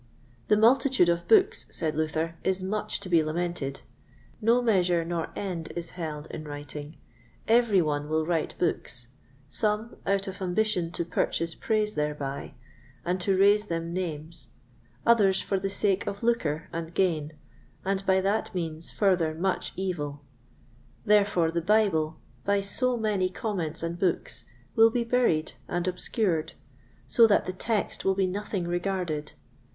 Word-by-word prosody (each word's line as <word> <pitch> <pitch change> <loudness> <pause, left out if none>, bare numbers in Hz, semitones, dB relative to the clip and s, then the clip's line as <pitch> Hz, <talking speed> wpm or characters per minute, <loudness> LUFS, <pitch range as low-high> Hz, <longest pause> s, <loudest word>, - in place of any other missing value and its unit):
The 210 - +4
multitude 240 -3 +4
of 170 0 0
books, 425 +2 +4
said 160 -2 -2
Luther, 160 +1 -1
is 190 0 +1
much 210 +3 -2
to - - -6
be 170 -3 +4
lamented; 155 -3 -3 0.6
no 230 +3 +4
measure 180 -8 +2
nor 170 -1 -2
end 180 -5 -4
is 170 -1 -5
held 155 -4 -5
in 155 - -6
writing; 145 +1 -7 0.5
every 225 -5 +4
one 145 -1 -2
will 155 0 +1
write 165 -2 -1
books; 120 -8 -2 0.4
some 215 +8 0
out 195 0 +1
of 190 0 -7
ambition 185 -2 +1
to 170 - -2
purchase 165 0 -1
praise 215 +1 0
thereby, 150 -2 -3 0.5
and 180 +1 -1
to 190 +1 +2
raise 205 +2 +4
them 165 -1 -3
names; 165 -2 -5 0.6
others 205 -5 +5
for 195 - -1
the 195 - -2
sake 200 -1 0
of 200 +3 -4
lucre 165 -10 0
and 165 0 -5
gain, 160 -5 +1 0.5
and 195 0 0
by 190 0 +4
that 200 +1 -1
means 165 -2 -3
further 180 -6 +1
much 185 +3 -1
evil. 150 -7 -3 0.8
Therefore 200 -6 +3
the 170 0 -1
Bible, 170 -5 +2 0.3
by 200 0 +2
so 245 +5 +3
many 205 -5 +1
comments 180 -6 -3
and 170 +1 -3
books, 185 -3 -1 0.3
will 225 0 +7
be 240 +1 0
buried 230 -10 +1 0.2
and 175 +1 -2
obscured, 180 -2 -1 0.5
so 230 -1 +6
that 205 - +3
the 185 - -3
Text 215 +3 -2
will 195 0 +2
be 195 0 +2
nothing 190 -1 -3
regarded. 175 -4 -2
180 Hz, 150 wpm, -27 LUFS, 160-205 Hz, 0.8 s, will